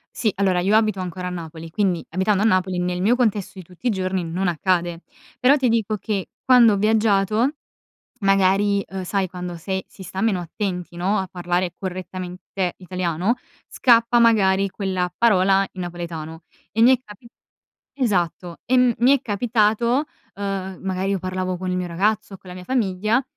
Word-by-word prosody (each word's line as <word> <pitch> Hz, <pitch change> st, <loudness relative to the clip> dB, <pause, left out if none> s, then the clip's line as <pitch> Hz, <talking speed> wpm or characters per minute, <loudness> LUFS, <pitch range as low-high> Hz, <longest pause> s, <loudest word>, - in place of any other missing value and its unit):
Sì, 215 Hz, -4 st, +1 dB
allora, 190 Hz, -2 st, +2 dB
io 195 Hz, +4 st, +2 dB
abito 215 Hz, -3 st, +2 dB
ancora 180 Hz, 0 st, -5 dB
a -, -, -2 dB
Napoli, 165 Hz, -1 st, -8 dB
quindi 185 Hz, -3 st, 0 dB
abitando 190 Hz, +3 st, +1 dB
a -, -, +2 dB
Napoli, 185 Hz, -3 st, +2 dB
nel 180 Hz, 0 st, -1 dB
mio 225 Hz, +6 st, +3 dB
contesto 210 Hz, -6 st, -1 dB
di 185 Hz, -, -8 dB
tutti 180 Hz, +8 st, -7 dB
i -, -, +4 dB
giorni 190 Hz, -3 st, -1 dB
non 175 Hz, +3 st, -2 dB
accade, 175 Hz, 0 st, 0 dB, 0.4 s
però 270 Hz, +4 st, +5 dB
ti 260 Hz, -3 st, +1 dB
dico 220 Hz, -2 st, 0 dB
che 200 Hz, -2 st, -3 dB, 0.2 s
quando 245 Hz, -4 st, +6 dB
ho -, -, 0 dB
viaggiato 215 Hz, +4 st, +2 dB, 0.6 s
magari, 195 Hz, 0 st, +2 dB
uhm, 190 Hz, 0 st, -5 dB
sai 195 Hz, +1 st, -1 dB
quando, 180 Hz, -1 st, -6 dB
se 190 Hz, +3 st, -4 dB
si 190 Hz, -, -13 dB
sta 185 Hz, +2 st, -5 dB
meno 220 Hz, -5 st, +1 dB
attenti 180 Hz, 0 st, -5 dB
no, 190 Hz, +4 st, +1 dB
a 190 Hz, -, -1 dB
parlare 175 Hz, 0 st, -2 dB
correttamente 185 Hz, 0 st, -5 dB
italiano, 185 Hz, +3 st, -1 dB, 0.3 s
scappa 235 Hz, -1 st, +4 dB
magari 200 Hz, -4 st, +4 dB
quella 185 Hz, -2 st, -2 dB
parola 195 Hz, -3 st, +3 dB
in 185 Hz, -, -6 dB
napoletano 165 Hz, -2 st, -6 dB, 0.3 s
e 225 Hz, -, +2 dB
mi 250 Hz, -, +7 dB
è -, -, -13 dB
capi 210 Hz, +1 st, -14 dB, 0.7 s
esatto, 180 Hz, -, -1 dB
e 255 Hz, -, +2 dB
mi 250 Hz, 0 st, +4 dB
è -, -, -18 dB
capitato, 235 Hz, +3 st, +1 dB, 0.3 s
uhm, 195 Hz, -2 st, -4 dB
magari 190 Hz, 0 st, -2 dB
io 200 Hz, -, +1 dB
parlavo 185 Hz, 0 st, -3 dB
con 185 Hz, +1 st, -3 dB
il -, -, -1 dB
mio 180 Hz, -1 st, -2 dB
ragazzo 205 Hz, +4 st, 0 dB
o -, -, -13 dB
con 185 Hz, -, -15 dB
la -, -, -8 dB
mia 180 Hz, 0 st, -9 dB
famiglia, 215 Hz, 0 st, +1 dB
190 Hz, 175 wpm, -22 LUFS, 180-215 Hz, 0.7 s, mi